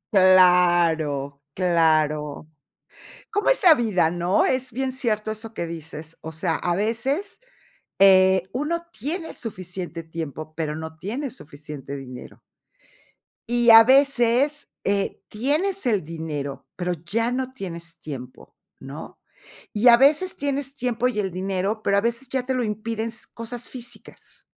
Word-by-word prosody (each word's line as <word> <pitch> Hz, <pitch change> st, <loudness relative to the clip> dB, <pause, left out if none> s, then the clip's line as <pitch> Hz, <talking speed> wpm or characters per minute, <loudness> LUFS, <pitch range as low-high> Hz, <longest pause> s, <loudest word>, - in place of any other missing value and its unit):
Claro, 175 Hz, -6 st, +4 dB
claro. 155 Hz, -4 st, +1 dB, 0.9 s
¿Cómo 410 Hz, 0 st, 0 dB
es -, -, +3 dB
la 335 Hz, -4 st, +9 dB
vida, 210 Hz, -, +1 dB
no? 175 Hz, +2 st, +1 dB
Es 255 Hz, 0 st, 0 dB
bien 265 Hz, +2 st, -2 dB
cierto 220 Hz, -5 st, -1 dB
eso 220 Hz, +1 st, -8 dB
que 170 Hz, -6 st, -4 dB
dices, 160 Hz, -1 st, -8 dB
o 160 Hz, -, -7 dB
sea, 160 Hz, +1 st, -2 dB
a 175 Hz, +1 st, -1 dB
veces, 265 Hz, -, -1 dB, 0.6 s
eh, 190 Hz, -1 st, +6 dB
uno 335 Hz, +6 st, -2 dB
tiene 320 Hz, -, -5 dB
suficiente 180 Hz, -6 st, -6 dB
tiempo, 155 Hz, -1 st, -7 dB
pero 155 Hz, -2 st, -3 dB
no 160 Hz, 0 st, -7 dB
tiene 245 Hz, -, -4 dB
suficiente 145 Hz, -, -9 dB
dinero. 130 Hz, -2 st, -10 dB, 1.1 s
Y 240 Hz, -1 st, +4 dB
a 225 Hz, 0 st, +11 dB
veces, 270 Hz, +2 st, +3 dB, 0.2 s
eh, 200 Hz, 0 st, -1 dB
tienes 300 Hz, -, -1 dB
el 210 Hz, -7 st, +1 dB
dinero, 145 Hz, -4 st, -5 dB
pero 180 Hz, 0 st, -1 dB
ya 205 Hz, +8 st, -2 dB
no 260 Hz, +1 st, -2 dB
tienes 170 Hz, -7 st, -8 dB
tiempo, 130 Hz, -4 st, -9 dB, 0.2 s
¿no? -, -, -10 dB, 0.5 s
Y 215 Hz, +4 st, +5 dB
a 235 Hz, -, +8 dB
veces 305 Hz, +7 st, +3 dB
tienes 280 Hz, -1 st, -2 dB
tiempo 250 Hz, -2 st, 0 dB
y 215 Hz, -, -3 dB
el 190 Hz, -2 st, -1 dB
dinero, 195 Hz, +3 st, -2 dB
pero 200 Hz, 0 st, +2 dB
a -, -, +3 dB
veces 235 Hz, +3 st, -2 dB
ya 260 Hz, -2 st, -2 dB
te 260 Hz, -, -1 dB
lo 255 Hz, -1 st, 0 dB
impiden 220 Hz, +1 st, -3 dB
s 235 Hz, -, -6 dB
cosas 230 Hz, +1 st, -5 dB
físicas. 245 Hz, -2 st, -10 dB
200 Hz, 140 wpm, -23 LUFS, 165-250 Hz, 1.1 s, a